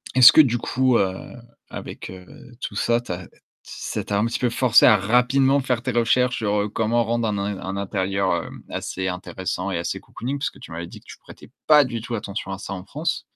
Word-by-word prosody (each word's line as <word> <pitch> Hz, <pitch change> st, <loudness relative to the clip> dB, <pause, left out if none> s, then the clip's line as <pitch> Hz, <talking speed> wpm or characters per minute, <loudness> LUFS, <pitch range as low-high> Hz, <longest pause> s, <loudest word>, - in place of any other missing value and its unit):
est-ce 130 Hz, -1 st, +10 dB
que -, -, +4 dB
du 120 Hz, -5 st, +5 dB
coup, 130 Hz, -1 st, +2 dB
heu, 95 Hz, -1 st, +1 dB, 0.6 s
avec -, -, -8 dB
heu, 90 Hz, -1 st, -11 dB, 0.4 s
tout 100 Hz, -, -5 dB
ça, 115 Hz, +3 st, +1 dB
tu 120 Hz, -, -8 dB
as 90 Hz, 0 st, -6 dB, 0.4 s
ça -, -, -5 dB
t'a 100 Hz, -1 st, -1 dB
un 110 Hz, -, +2 dB
petit 115 Hz, -, -2 dB
peu 125 Hz, -, +1 dB
forcé 120 Hz, 0 st, +5 dB
à 110 Hz, -4 st, +7 dB
rapidement 130 Hz, +6 st, +3 dB
faire 125 Hz, -3 st, -1 dB
tes 130 Hz, -1 st, -2 dB
recherches 120 Hz, +2 st, +2 dB
sur 105 Hz, -1 st, 0 dB
comment 115 Hz, +1 st, +1 dB
rendre 115 Hz, -1 st, 0 dB
un 100 Hz, -, -2 dB, 0.2 s
un 95 Hz, +1 st, -5 dB
intérieur, 95 Hz, -3 st, -1 dB
hem, -, -, -10 dB
assez 95 Hz, 0 st, -4 dB
intéressant 90 Hz, +1 st, -4 dB
et 85 Hz, -, -1 dB
assez 85 Hz, -, -3 dB
cocooning 135 Hz, +4 st, -5 dB
parce 140 Hz, -, -2 dB
que -, -, -18 dB
tu -, -, -12 dB
m'avais 85 Hz, +1 st, -5 dB
dit -, -, -12 dB
que -, -, -29 dB
tu -, -, -11 dB
prêtais -, -, -15 dB, 0.2 s
pas 150 Hz, -2 st, +7 dB
du 120 Hz, -3 st, -4 dB
tout 120 Hz, 0 st, -4 dB
attention 100 Hz, -1 st, -5 dB
à 95 Hz, -, -4 dB
ça 100 Hz, -, -7 dB
en 90 Hz, -1 st, -7 dB
France. 160 Hz, +4 st, -3 dB
115 Hz, 225 wpm, -23 LUFS, 95-125 Hz, 0.6 s, est-ce